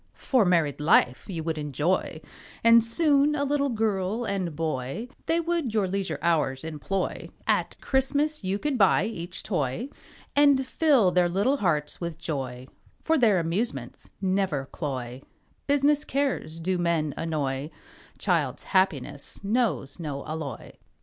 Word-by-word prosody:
For 255 -6 +2
married 165 -6 +2
life 150 -3 +3
you 165 -4 -4
would 160 -1 -2
enjoy, 150 +3 -1 0.4
And 230 0 +7
soon 290 +4 +3
a 285 - 0
little 285 0 +1
girl 215 -1 -1
and 185 -6 -2
boy, 155 - -3 0.2
They 330 +1 +2
would 335 -9 -1
your 205 -3 +2
leisure 195 +1 -2
hours 150 -5 +1
employ, 160 +5 -3 0.2
At - - 0
Christmas 285 +2 0
you 190 +1 0
could 275 +2 -2
buy 195 -2 +4
each 175 -5 -6
toy, 175 - -2 0.5
And 285 -2 +5
fill 260 - +3
their 180 -1 +3
little 205 +11 +1
hearts 155 - -1
with 170 -2 -4
joy, 130 -6 -4 0.4
For 320 - +2
their 225 - +4
amusements 165 - -3
never 185 -7 0
cloy, 130 -4 -5 0.5
Business 290 +1 +3
cares 270 - -2
do 180 +2 -1
men 165 -4 0
annoy, 145 -3 -2 0.5
Child's 150 -8 0
happiness 145 -5 0
knows 205 - 0
no 145 -4 -5
alloy. 155 -6 -6
185 Hz, 135 wpm, -26 LUFS, 150-240 Hz, 0.5 s, And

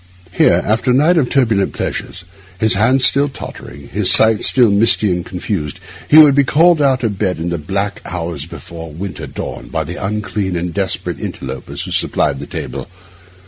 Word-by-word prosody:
Here, - - +3
after 110 +4 0
a 125 - +3
night 160 +5 +3
of 125 -5 0
turbulent 115 -8 +1
pleasures, 90 -1 -5 0.3
his 110 +3 +3
hand 125 +6 +2
still 140 +3 +5
tottering, 70 - -10
his 100 -1 0
sight 110 +3 +6
still 120 -5 +5
misty 105 -1 +3
and 90 0 -2
confused, 90 -5 -5 0.3
he 150 - +6
would 150 -3 +8
be 140 +1 +3
called 160 +3 +3
out 135 -3 +1
of 105 -4 -2
bed 95 -3 -1
in 85 +2 -4
the 85 -1 -3
black 100 +6 -3
hours 85 -4 -5
before 85 -1 -10
the 75 - -13
winter 95 +1 -6
dawn - - -7
by 80 -1 -3
the 85 +6 -7
unclean 100 -2 -3
and 85 0 -3
desperate 95 0 -3
interlopers 65 -1 -6
who - - -7
supplied 70 -2 0
the - - -8
table. - - -6
100 Hz, 185 wpm, -16 LUFS, 85-125 Hz, 0.3 s, would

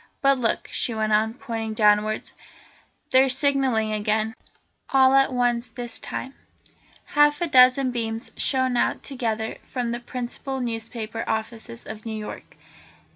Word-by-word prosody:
But 275 -1 +4
look," 230 -2 0
she 235 - 0
went 215 -1 0
on, 220 +2 +2
pointing 225 -4 -4
downwards, 210 0 +2 0.8
"they're 265 +1 +5
signalling 265 -5 +2
again, 215 +1 0 0.6
all 265 -1 +5
at 270 0 +4
once 245 -1 +1
this 240 0 -6
time." 265 - -5 0.7
Half 295 0 +3
a 345 - +1
dozen 255 -2 +5
beams 225 0 -3
shone 260 -2 +1
out - - 0
together 225 -5 -3
from 245 -2 -3
the 240 - -3
principal 250 +2 -5
newspaper 225 -1 -4
offices 220 - -4
of 215 0 -8
New 220 -1 -5
York. 210 - -8
235 Hz, 135 wpm, -24 LUFS, 220-260 Hz, 0.8 s, they're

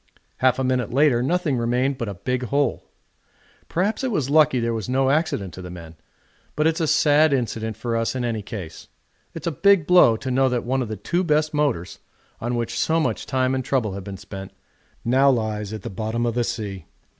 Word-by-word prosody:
Half 130 -1 +3
a 130 - -1
minute 125 -3 0
later 135 -2 +3
nothing 150 -2 0
remained 125 +3 0
but 115 - -3
a 100 - -6
big 125 +6 -2
hole. 140 0 0 0.8
Perhaps 200 +9 -1
it 260 - 0
was 145 - -1
lucky 150 -4 +4
there 115 0 -1
was 110 0 -4
no 135 +1 +2
accident 145 - -1
to 95 - -8
the 90 - -8
men, 85 -2 -10 0.6
but 150 - +1
it's 160 0 +2
a 160 - +1
sad 150 +1 +4
incident 110 -4 -2
for 115 +1 -2
us 115 +2 -1
in 125 -1 -2
any 115 -2 -2
case. 95 -7 -8 0.5
It's - - -7
a 170 - 0
big 195 +2 +4
blow 175 -11 +6
to 130 +3 -4
know 130 +1 +3
that 125 -1 -1
one 130 +2 0
of 120 - -2
the 110 0 -5
two 175 - -1
best 155 -1 +1
motors, 140 - -1 0.4
on 120 +1 -2
which 120 -1 -2
so 160 +1 +2
much 155 - -2
time 130 -1 +1
and 130 -1 -1
trouble 125 -6 0
have 100 0 -6
been 100 0 -7
spent, 95 +1 -9 0.5
now 130 +4 +4
lies 110 -4 -1
at 110 -3 -6
the - - -5
bottom 110 +4 -2
of 120 - 0
the 120 0 0
sea. 100 -8 -5
125 Hz, 215 wpm, -23 LUFS, 110-145 Hz, 0.8 s, blow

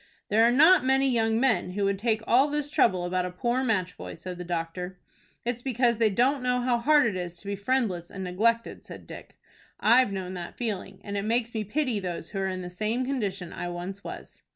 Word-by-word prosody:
"There 215 +2 +4
are 235 - +5
not 315 +8 +6
many 265 +1 +3
young 225 -3 +2
men 235 -8 +1
who 200 +1 0
would 195 -1 0
take 220 0 0
all 260 +4 +4
this 295 0 -2
trouble 185 -11 +3
about 180 +1 0
a - - -4
poor 240 +8 -1
match 185 -7 0
boy," - - -7
said 180 +1 -8
the - - -4
doctor. 175 +2 -4 0.5
"It's 240 0 -2
because 240 -2 +1
they 225 -2 +4
don't 250 +7 +2
know 250 0 +1
how 245 -1 +1
hard 290 +3 +4
it 210 -5 0
is 175 -1 -4
to 200 - -14
be 200 0 -2
friendless 200 -5 -1
and 190 - -6
neglected," 230 +6 0
said - - -11
Dick. - - -11 0.4
"I've 235 +1 +5
known 185 -1 -4
that 175 -2 -7
feeling, 200 -5 -4
and 200 -1 -4
it - - 0
makes 230 +2 0
me 220 -1 -1
pity 250 +1 -1
those 175 -3 -5
who 195 - -3
are 190 - 0
in 185 -1 -4
the 180 - -6
same 215 +7 -1
condition 200 -9 -3
I 175 - -4
once 180 +3 -6
was." - - -9
215 Hz, 225 wpm, -27 LUFS, 185-245 Hz, 0.5 s, not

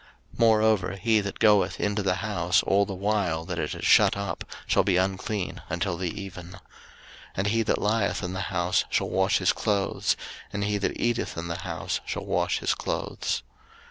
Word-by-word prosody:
03:014:046 - - -17
Moreover 110 -5 +3
he 110 +2 +2
that 100 0 -5
goeth 105 -4 +3
into 105 0 0
the 95 -2 +1
house 90 -4 +1
all 100 +1 +2
the 100 - -4
while 95 -5 0
that 85 -1 -4
it 75 - -2
is - - -5
shut - - +5
up 100 0 -3 0.2
shall - - +3
be 95 -2 +2
unclean 95 +1 -2
until 85 +1 -1
the 90 0 -2
even. 90 -3 -8
03:014:047 95 - -11 0.8
And 95 +2 0
he 115 +2 +2
that 110 - +1
lieth 105 -1 +1
in 90 0 -3
the 95 - -3
house 85 -2 +1
shall - - 0
wash 95 +2 +2
his 95 - +2
clothes; 100 -3 0 0.3
and 100 - -2
he 105 0 0
that 100 - -2
eateth 120 -5 -1
in 85 +1 -4
the 85 - -3
house - - -3
shall - - -3
wash - - +1
his - - +1
clothes. - - -3
100 Hz, 195 wpm, -26 LUFS, 90-105 Hz, 0.8 s, shut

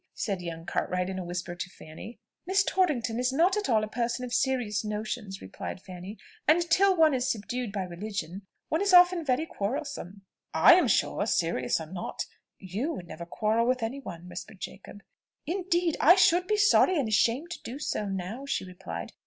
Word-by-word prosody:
said 195 -4 -2
young 165 -1 -6
Cartwright 180 +1 -1
in 190 - -4
a - - -4
whisper 175 0 -4
to 175 +1 -5
Fanny. 180 +6 -11 0.3
"Miss 390 +2 +3
Torrington 280 - +1
is 250 +1 +1
not 340 +8 +3
at 420 -6 -2
all 220 -3 +3
a - - -2
person 240 +2 -2
of 245 - -7
serious 245 -6 0
notions," 210 -1 -4
replied 95 - -7
Fanny; 185 +3 -9 0.3
"and 340 +3 +4
till 385 +2 +5
one 315 -2 +5
is 255 -1 0
subdued 235 +1 -3
by 195 -2 -2
religion, 185 0 -5 0.3
one 320 - +1
is 395 -2 +4
often 355 -1 +6
very 275 +2 +1
quarrelsome." 200 - -4 0.3
"I 160 - +8
am 360 - +4
sure, - - +1
serious 165 -7 +1
or 160 - -6
not, 175 +2 -5 0.3
you 210 - -3
would 180 - -7
never 170 +2 -8
quarrel 220 +5 +1
with 255 -1 +1
any 245 +5 -3
one," 175 -10 -9
whispered 180 +2 -9
Jacob. 195 +1 -9 0.4
"Indeed 345 -1 0
I 345 +5 +7
should 360 -1 +4
be 425 - +2
sorry 405 -3 +5
and 275 -6 +1
ashamed 235 +9 +1
to - - -6
do 245 +4 -6
so 215 -7 -2
now," 195 +8 -5
she 235 - -1
replied. 85 - -7
225 Hz, 190 wpm, -28 LUFS, 185-315 Hz, 0.4 s, I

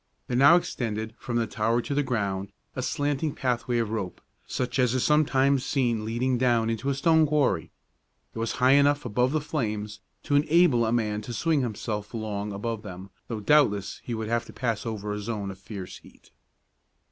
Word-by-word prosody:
There 125 - -3
now 140 +6 +7
extended 110 -9 -2
from 120 - -4
the 115 - +1
tower 110 +2 0
to 140 - -3
the 145 - +2
ground 100 -7 -2 0.2
a 130 - -2
slanting 145 +2 -1
pathway 125 -1 -1
of 115 -2 -1
rope, 100 -5 -4 0.3
such 125 +1 -2
as 125 -1 +3
is 130 - +1
sometimes 140 -3 +3
seen 120 -6 0
leading 120 +3 0
down 120 -3 +2
into 115 +5 -2
a 140 - 0
stone 160 +2 +4
quarry. 125 - +1 0.6
It - - -6
was 115 0 -1
high 125 +1 +3
enough 145 0 +4
above 125 +3 +1
the 155 - +1
flames 110 -8 -3 0.2
to - - -2
enable 150 -5 +4
a - - 0
man 105 -3 0
to 120 +3 -7
swing 160 +3 +1
himself 110 -2 -4
along 105 -2 -3
above 110 +2 -4
them, 95 -2 -9 0.2
though 110 -3 -4
doubtless 105 -7 +2
he 120 - -4
would 110 -1 -4
have 115 +1 0
to - - -12
pass 115 -3 -2
over 105 -2 -3
a 105 - -3
zone 105 -2 -4
of 95 - -12
fierce 95 -2 -8
heat. - - -20
120 Hz, 195 wpm, -26 LUFS, 105-135 Hz, 0.6 s, now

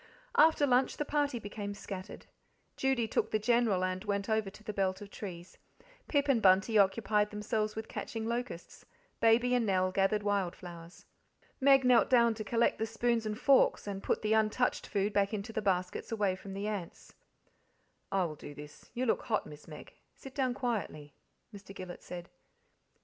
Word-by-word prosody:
After 310 -1 +5
lunch 255 -1 +2
the 295 - -2
party 290 -3 0
became 205 -1 -6
scattered. 195 0 -8 0.5
Judy 265 -4 +1
took - - 0
the 215 - +1
General 220 -4 +2
and 185 0 -2
went 200 0 -2
over 220 -2 +1
to 210 +2 -16
the 210 - -5
belt 190 -1 0
of 205 -1 -10
trees; 175 -3 -9 0.5
Pip 285 -1 +1
and 260 -5 +3
Bunty 195 +3 +4
occupied 210 +1 +3
themselves 215 0 -2
with 220 0 -5
catching 225 -1 -5
locusts; 235 -6 -5 0.4
Baby 235 +2 +4
and 245 -1 +3
Nell 185 -3 +1
gathered 195 +2 +1
wild 200 -3 0
flowers. 170 0 -11 0.5
Meg 270 0 +5
knelt 245 -3 +5
down 235 -2 +5
to 215 -1 -6
collect 230 +3 +1
the 220 - -1
spoons 230 0 0
and 210 0 -3
forks: 275 +1 +4
and 200 -1 -5
put - - -1
the 215 0 +2
untouched 220 +3 +1
food 200 0 -1
back 200 +1 +1
into 210 +2 -6
the 220 - -1
baskets 185 -1 -1
away 205 -4 +1
from 195 +1 -9
the 200 +1 -4
ants. 200 -6 -6 1.0
"I 195 -1 +2
will 160 - -4
do 145 0 -10
this 150 +1 -12
you 250 +2 -1
look 225 - +1
hot, 215 - 0
Miss 150 0 -12
Meg; 150 -2 -11 0.2
sit 270 - -11
down 260 -3 0
quietly," 210 - -3 0.4
Mr. 200 -1 -11
Gillet 185 -2 -8
said. 175 0 -8
210 Hz, 180 wpm, -32 LUFS, 195-235 Hz, 1.0 s, After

